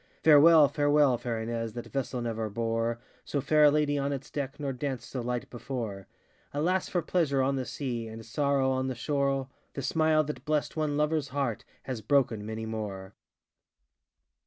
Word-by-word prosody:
Farewell, 155 0 +8
farewell, 145 -2 +3
fair 120 -2 -3
Ines, 115 0 -3
That 120 - -6
vessel 130 -2 -3
never 115 -2 -2
bore 115 +2 -1 0.3
So 145 - -2
fair 150 +2 +4
a - - +8
lady 145 -1 +1
on 140 +1 -1
its 135 -1 -5
deck, 140 -1 -4
Nor 140 -2 -2
danced 130 -1 -4
so 130 - -3
light 120 0 -3
before, 115 -6 -5
ŌĆö - - -16
Alas 180 +4 +1
for 175 -2 0
pleasure 140 -7 +1
on 135 +1 +1
the 130 -1 -2
sea, 120 -2 -4
And 110 0 -9
sorrow 140 +1 +1
on 130 0 0
the 130 - -3
shorel 140 0 0 0.3
The 140 - -4
smile 155 +2 +3
that 150 0 -6
blest 150 -1 -1
one 155 -2 0
loverŌĆÖs 150 -1 0
heart 135 -5 -2 0.2
Has 125 -4 -4
broken 115 -2 +2
many 110 +1 -5
more! 100 -3 -5
135 Hz, 180 wpm, -29 LUFS, 115-145 Hz, 0.3 s, Farewell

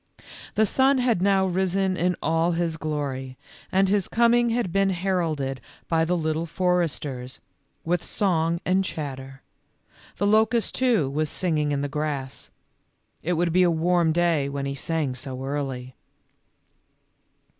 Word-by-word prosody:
The 220 - +4
sun 265 +6 +3
had 245 -7 +1
now 195 0 +3
risen 190 +1 0
in 180 0 +1
all 165 +2 +2
his 165 -1 -1
glory, 140 -5 -4 0.3
and 195 +1 +3
his 200 -1 +1
coming 235 +1 +3
had 230 -6 -1
been 195 +1 +2
heralded 165 -8 -1 0.3
by 165 -1 +2
the 175 +2 0
Little 160 0 -1
Foresters, 155 -8 -1 0.5
with 175 +1 0
song 170 -4 0
and 190 +1 +2
chatter; 135 -5 -6 0.7
the 200 - 0
locust, 220 +2 +2
too, 240 - +2
was 150 +3 -1
singing 155 -5 0
in 140 -1 0
the 145 - -1
grass; 145 -2 -4 0.7
it 180 - -1
would 170 0 0
be 185 - +4
a 180 - +5
warm 170 0 +2
day, 165 -4 +1
when 140 0 -3
he 140 - -2
sang 145 -1 -2
so 130 0 -6
early. 135 -2 -4
165 Hz, 145 wpm, -25 LUFS, 145-190 Hz, 0.7 s, a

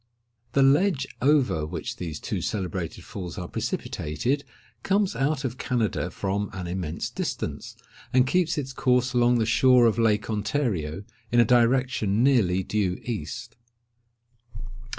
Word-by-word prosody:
The 140 - +4
ledge 145 +1 +3 0.2
over 135 - +3
which 75 - -5
these 80 -4 -5
two - - -3
celebrated 90 -4 -3
falls 90 0 -7
are 90 -2 -4
precipitated, 125 - -2 0.4
comes 200 0 +1
out 140 +1 0
of 125 0 -4
Canada 115 -8 -1
from 100 +2 -2
an 95 -2 -5
immense 85 -2 -3
distance, - - -4 0.4
and 130 0 +4
keeps 175 +4 +1
its 135 -2 -3
course 125 -1 +1
along 120 0 +4
the 115 - +1
shore 125 +2 +5
of 115 0 +2
Lake 105 -2 +2
Ontario, 105 - -2 0.3
in 120 - +4
a 120 - +6
direction 120 -2 +2
nearly 100 -9 +3
due 95 -2 -1
east. 115 0 -5
115 Hz, 135 wpm, -26 LUFS, 95-130 Hz, 0.4 s, a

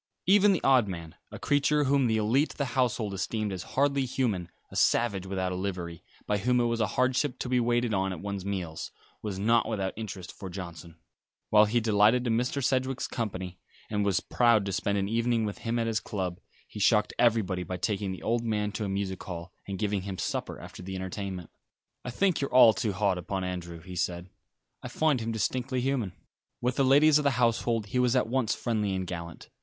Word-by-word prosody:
Even 205 +2 +6
the 185 - 0
odd 130 -5 +5
man, 85 -4 -6 0.2
a - - -8
creature 145 +1 +2
whom 135 -2 +3
the 110 -1 +2
élite 120 +8 +2
of - - -23
the 140 - 0
household 120 -5 0
esteemed 105 +1 -2
as 90 - -4 0.2
hardly 140 0 +3
human 115 -9 -1 0.2
a - - -10
savage 100 -5 +2
without 95 -1 -2
a - - -2
livery, 90 -3 -4 0.2
by 105 0 0
whom 125 +4 +2
it - - +3
was 115 -1 0
a 110 - +2
hardship 130 +2 +1
to - - -4
be 125 0 +2
waited 120 -1 +1
on 95 -1 0
at 90 - -5
one's 100 0 -4
meals 90 -5 -4 0.3
was 105 -3 -4
not 115 +4 +3
without 100 -4 -2
interest 100 -4 -6
for 95 - -8
Johnson. 85 -3 -8 0.6
While 105 0 +7
he 115 +3 +1
delighted 110 +2 +3
in 115 -2 +2
Mr. 125 +4 -1
Sedgewick's 130 0 0
company, 95 -6 -4 0.3
and 105 -1 +1
was 95 -2 +1
proud 115 -4 +3
to 100 - -2
spend 100 +2 0
an 100 0 0
evening 115 +1 +1
with 105 - -5
him 115 +1 -2
at 115 - 0
his 110 -1 0
club, 95 -5 -4 0.3
he - - -9
shocked 105 +2 +3
everybody 105 -6 +2
by 90 +1 -4
taking 100 0 -1
the 95 - -7
old 115 +1 0
man 105 -2 -1
to 110 - -4
a - - -3
music 95 -1 -3
hall, 90 0 -7
and 100 -1 -4
giving 105 -1 -1
him 95 0 -5
supper - - -3
after - - -10
the 95 +1 -6
entertainment. 95 -1 -5 0.5
"I 125 - -5
think 180 +7 +1
you're 140 - -2
all 120 -3 +8
too 100 +1 -1
hard 95 -2 +1
upon 95 +2 -3
Andrew," 85 -2 -5
he 90 +2 -9
said. 90 +1 -2 0.5
"I - - -6
find 155 -4 +1
him 115 +1 -2
distinctly 125 +3 -1
human." 125 -7 -1 0.5
With 125 0 -1
the 140 - +4
ladies 145 +3 +6
of - - -1
the 140 - +4
household 115 -2 +1
he 125 +5 -1
was 125 0 +3
at 125 - +3
once 120 -1 0
friendly 105 -5 -1
and 95 0 -2
gallant. 85 -1 -7
105 Hz, 215 wpm, -28 LUFS, 95-125 Hz, 0.6 s, all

